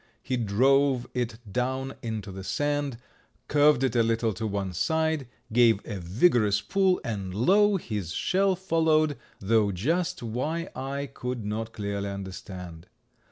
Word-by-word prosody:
He 130 Hz, -, -1 dB
drove 130 Hz, +4 st, +3 dB
it 120 Hz, -2 st, -2 dB, 0.2 s
down 130 Hz, +2 st, -1 dB
into 110 Hz, -4 st, -4 dB
the 95 Hz, 0 st, -7 dB
sand, 145 Hz, +2 st, -1 dB, 0.5 s
curved 145 Hz, -2 st, +4 dB
it 130 Hz, -3 st, +1 dB
a 120 Hz, -, +5 dB
little 115 Hz, -1 st, +1 dB
to 110 Hz, +4 st, -3 dB
one 100 Hz, -2 st, -3 dB
side, 160 Hz, -, 0 dB, 0.3 s
gave 115 Hz, -3 st, +5 dB
a 105 Hz, -4 st, -5 dB
vigorous 105 Hz, -, +3 dB
pull, 190 Hz, -, +2 dB
and 100 Hz, -6 st, -4 dB
lo! 200 Hz, -, +4 dB
his 105 Hz, -, -4 dB
shell 190 Hz, -, +1 dB
followed, 160 Hz, -4 st, +2 dB, 0.2 s
though 105 Hz, 0 st, +2 dB
just 155 Hz, -, -1 dB
why 150 Hz, +10 st, -2 dB
I 135 Hz, +2 st, -3 dB
could 125 Hz, -3 st, -4 dB
not 110 Hz, +2 st, -3 dB
clearly 100 Hz, -1 st, -3 dB
understand. 90 Hz, -3 st, -8 dB
120 Hz, 140 wpm, -27 LUFS, 100-145 Hz, 0.5 s, a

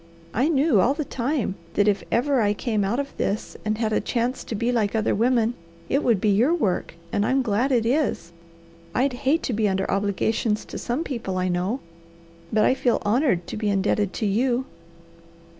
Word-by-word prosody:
I 260 Hz, +7 st, +2 dB
knew 280 Hz, -, +3 dB
all 265 Hz, +8 st, +2 dB
the 305 Hz, -1 st, -3 dB
time 260 Hz, -4 st, -1 dB, 0.2 s
that 205 Hz, -, +3 dB
if 205 Hz, -2 st, +2 dB
ever 265 Hz, +1 st, +2 dB
I 205 Hz, -1 st, +2 dB
came 215 Hz, -2 st, -1 dB
out 210 Hz, +7 st, 0 dB
of 280 Hz, 0 st, -4 dB
this, 200 Hz, +2 st, -2 dB
and 215 Hz, 0 st, -1 dB
had 220 Hz, -1 st, 0 dB
a -, -, +2 dB
chance 245 Hz, +1 st, -1 dB
to 225 Hz, -, -4 dB
be 235 Hz, +3 st, 0 dB
like 225 Hz, -3 st, 0 dB
other 220 Hz, -1 st, +1 dB
women, 235 Hz, +1 st, +2 dB, 0.4 s
it 275 Hz, -, +1 dB
would 230 Hz, -5 st, +3 dB
be 210 Hz, -, +1 dB
your 235 Hz, -, +3 dB
work, 195 Hz, -, -1 dB, 0.2 s
and 205 Hz, -, +2 dB
I'm 265 Hz, +4 st, +2 dB
glad 235 Hz, +4 st, +1 dB
it 235 Hz, -3 st, +2 dB
is. 250 Hz, -, 0 dB, 0.6 s
I'd 265 Hz, +1 st, +2 dB
hate 270 Hz, +6 st, +1 dB
to 250 Hz, -, -1 dB
be 215 Hz, -1 st, +1 dB
under 190 Hz, 0 st, 0 dB
obligations 205 Hz, +2 st, 0 dB
to -, -, -7 dB
some 250 Hz, +7 st, -2 dB
people 230 Hz, -, -4 dB
I 185 Hz, 0 st, 0 dB
know; 185 Hz, +9 st, -1 dB, 0.7 s
but 215 Hz, -1 st, +3 dB
I -, -, +4 dB
feel 250 Hz, -2 st, +1 dB
honoured 210 Hz, -, +2 dB
to -, -, -6 dB
be 210 Hz, -1 st, -1 dB
indebted 200 Hz, 0 st, +1 dB
to 220 Hz, -, -2 dB
you." 240 Hz, +5 st, +1 dB
230 Hz, 200 wpm, -24 LUFS, 205-260 Hz, 0.7 s, I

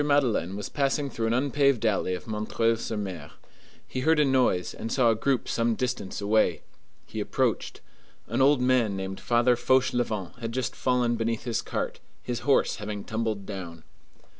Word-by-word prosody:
Madeleine 130 Hz, -, +1 dB
was 105 Hz, -, -4 dB
passing 140 Hz, 0 st, 0 dB
through 115 Hz, -1 st, -2 dB
an 115 Hz, -, +1 dB
unpaved 140 Hz, -2 st, +2 dB
alley 100 Hz, -4 st, +1 dB
of 90 Hz, -, -9 dB
M. 105 Hz, -1 st, -3 dB, 0.3 s
sur 115 Hz, 0 st, -4 dB
M.; 95 Hz, -8 st, -5 dB, 0.6 s
he 130 Hz, -, -4 dB
heard 160 Hz, +4 st, +3 dB
a 150 Hz, -, +5 dB
noise, 130 Hz, -9 st, +2 dB
and 115 Hz, -, -6 dB
saw 125 Hz, -4 st, +4 dB
a -, -, +1 dB
group 130 Hz, +3 st, 0 dB
some 115 Hz, -1 st, +1 dB
distance 125 Hz, -6 st, -3 dB
away. 105 Hz, +2 st, +2 dB, 0.4 s
He -, -, -6 dB
approached. -, -, -1 dB, 0.4 s
An 120 Hz, +4 st, -1 dB
old 140 Hz, -1 st, +5 dB
man 125 Hz, -5 st, +2 dB
named 95 Hz, 0 st, -5 dB
Father 120 Hz, +1 st, +3 dB
Fauchelevent 120 Hz, -6 st, 0 dB
had 115 Hz, -1 st, -4 dB
just 130 Hz, -1 st, -2 dB
fallen 125 Hz, -2 st, +1 dB
beneath 115 Hz, 0 st, -1 dB
his 120 Hz, -2 st, -1 dB
cart, -, -, -3 dB, 0.2 s
his 120 Hz, -1 st, -3 dB
horse 140 Hz, +1 st, +2 dB
having 105 Hz, -1 st, -5 dB
tumbled 110 Hz, -3 st, -2 dB
down. 85 Hz, -5 st, -7 dB
115 Hz, 170 wpm, -27 LUFS, 105-130 Hz, 0.6 s, a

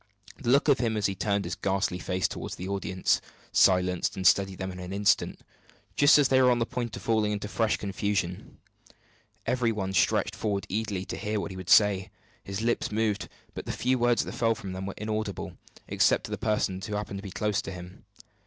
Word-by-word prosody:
The 120 Hz, -, -2 dB
look 140 Hz, +4 st, +4 dB
of 140 Hz, -3 st, +4 dB
him, 115 Hz, -3 st, 0 dB
as 105 Hz, -, 0 dB
he 100 Hz, -, +1 dB
turned 100 Hz, +1 st, -1 dB
his -, -, -3 dB
ghastly 95 Hz, -2 st, -1 dB
face 90 Hz, +1 st, 0 dB
toward -, -, -6 dB
the 90 Hz, -, -6 dB
audience, 95 Hz, -1 st, 0 dB, 0.3 s
silenced 90 Hz, -1 st, +3 dB
and 95 Hz, -, -4 dB
steadied 95 Hz, -1 st, +4 dB
them 95 Hz, 0 st, -4 dB
in 90 Hz, -, -9 dB
an 90 Hz, 0 st, -7 dB
instant, 100 Hz, +1 st, +1 dB, 0.5 s
just 145 Hz, +1 st, +7 dB
as 145 Hz, -2 st, +4 dB
they 130 Hz, 0 st, +5 dB
were 125 Hz, -, +6 dB
on 120 Hz, -, +3 dB
the 115 Hz, -, +1 dB
point 120 Hz, -2 st, -4 dB
of -, -, -9 dB
falling 110 Hz, -2 st, +1 dB
into 105 Hz, 0 st, -3 dB
fresh 110 Hz, +1 st, 0 dB
confusion. 100 Hz, -2 st, -3 dB, 0.9 s
Every 125 Hz, -1 st, +1 dB
one 95 Hz, -3 st, -3 dB
stretched -, -, +2 dB
forward 100 Hz, -3 st, -2 dB
eagerly 100 Hz, -2 st, -2 dB
to -, -, -5 dB
hear 105 Hz, 0 st, -2 dB
what 100 Hz, -, -4 dB
he 95 Hz, -, -8 dB
would 95 Hz, -1 st, -7 dB
say. 100 Hz, -3 st, +5 dB, 0.3 s
His 100 Hz, +3 st, -4 dB
lips 120 Hz, -1 st, 0 dB
moved; 105 Hz, -1 st, -1 dB, 0.2 s
but -, -, -7 dB
the -, -, -1 dB
few 130 Hz, +1 st, 0 dB
words 120 Hz, 0 st, +2 dB
that -, -, -5 dB
fell 115 Hz, -1 st, +1 dB
from 95 Hz, -3 st, -7 dB
them 95 Hz, +1 st, -5 dB
were 100 Hz, -, -5 dB
inaudible, 110 Hz, -1 st, -3 dB, 0.3 s
except -, -, +3 dB
to -, -, -8 dB
the -, -, -2 dB
persons 100 Hz, -3 st, -1 dB
who 105 Hz, -, -3 dB
happened 105 Hz, -1 st, -4 dB
to -, -, -10 dB
be 100 Hz, -, -6 dB
close 105 Hz, +1 st, -1 dB
by 100 Hz, -, -7 dB
him. 90 Hz, 0 st, -11 dB
100 Hz, 220 wpm, -28 LUFS, 95-110 Hz, 0.9 s, just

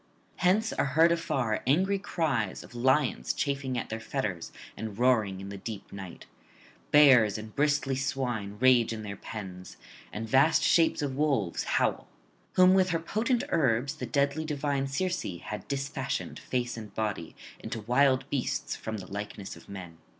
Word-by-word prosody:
Hence 195 Hz, +5 st, +2 dB
are 140 Hz, +1 st, -1 dB
heard 165 Hz, +1 st, +7 dB
afar 130 Hz, -10 st, 0 dB
angry 190 Hz, +8 st, +3 dB
cries 150 Hz, -, -1 dB
of -, -, -14 dB
lions 130 Hz, +5 st, +1 dB
chafing 135 Hz, -3 st, -2 dB
at 120 Hz, -, -3 dB
their 110 Hz, -, -4 dB
fetters 100 Hz, -5 st, -3 dB, 0.2 s
and 110 Hz, -2 st, -6 dB
roaring 110 Hz, -6 st, +2 dB
in 95 Hz, 0 st, -7 dB
the 100 Hz, -, -6 dB
deep 105 Hz, 0 st, -7 dB
night; 95 Hz, -3 st, -9 dB, 0.6 s
bears 125 Hz, -9 st, +6 dB
and 110 Hz, 0 st, -9 dB
bristly 145 Hz, -2 st, +1 dB
swine 125 Hz, -7 st, -2 dB
rage 125 Hz, -3 st, +5 dB
in 110 Hz, -1 st, -6 dB
their 100 Hz, -1 st, -5 dB
pens, 95 Hz, -3 st, -8 dB, 0.3 s
and 110 Hz, +2 st, -5 dB
vast 135 Hz, +7 st, +4 dB
shapes 165 Hz, -3 st, +3 dB
of 135 Hz, -2 st, -2 dB
wolves 135 Hz, -, 0 dB
howl; -, -, 0 dB, 0.5 s
whom 185 Hz, 0 st, +6 dB
with 190 Hz, -1 st, +4 dB
her 165 Hz, -1 st, 0 dB
potent 230 Hz, +9 st, 0 dB
herbs 135 Hz, -3 st, +1 dB
the 125 Hz, -, -5 dB
deadly 140 Hz, +5 st, +1 dB
divine 145 Hz, -2 st, -1 dB
Circe 180 Hz, +7 st, -1 dB, 0.2 s
had 105 Hz, -, -6 dB
disfashioned, 140 Hz, -1 st, -3 dB
face 125 Hz, -1 st, -2 dB
and 110 Hz, -2 st, -8 dB
body, 105 Hz, -7 st, -3 dB, 0.2 s
into 115 Hz, -, -5 dB
wild 130 Hz, +3 st, +3 dB
beasts 135 Hz, -3 st, -1 dB
from 110 Hz, 0 st, -5 dB
the 95 Hz, -, -8 dB
likeness 100 Hz, -1 st, -6 dB
of -, -, -16 dB
men. 90 Hz, -4 st, -9 dB
130 Hz, 160 wpm, -29 LUFS, 110-145 Hz, 0.6 s, heard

